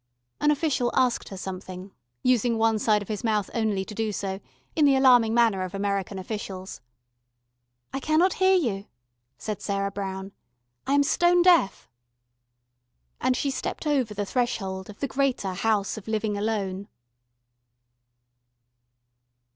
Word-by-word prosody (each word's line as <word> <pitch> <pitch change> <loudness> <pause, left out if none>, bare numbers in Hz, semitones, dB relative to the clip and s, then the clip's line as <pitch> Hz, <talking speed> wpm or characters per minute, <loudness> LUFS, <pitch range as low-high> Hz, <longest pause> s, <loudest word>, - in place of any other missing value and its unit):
An 295 - +3
official 290 -5 +1
asked 250 -2 +1
her 195 - -8
something, 185 0 -7 0.3
using 245 -2 +2
one 225 -1 +2
side 210 -1 +2
of - - -15
his 215 +2 -4
mouth 215 -3 0
only 215 -4 0
to 210 - -8
do 220 0 -1
so, 195 -1 -4 0.4
in 310 - +3
the 275 -1 +5
alarming 250 -4 +5
manner 225 -4 +3
of 185 0 -4
American 200 0 -2
officials. 190 -1 -6 1.1
"I 270 - -2
cannot 315 +6 +2
hear 380 0 +5
you," 215 - -1 0.5
said 215 -2 -5
Sarah 200 -1 -1
Brown. 195 -1 -5 0.6
"I 275 - +1
am 285 - +5
stone 350 +4 +3
deaf." 345 - +3 1.3
And 255 - +1
she 280 - 0
stepped 265 - -4
over 265 -8 0
the 205 0 -2
threshold 195 -5 -2
of 210 - -11
the 280 - 0
greater 260 -8 0
House 205 +1 0
of 215 - -10
Living 215 -1 -1
Alone. 200 -2 -2
215 Hz, 140 wpm, -26 LUFS, 195-255 Hz, 1.3 s, the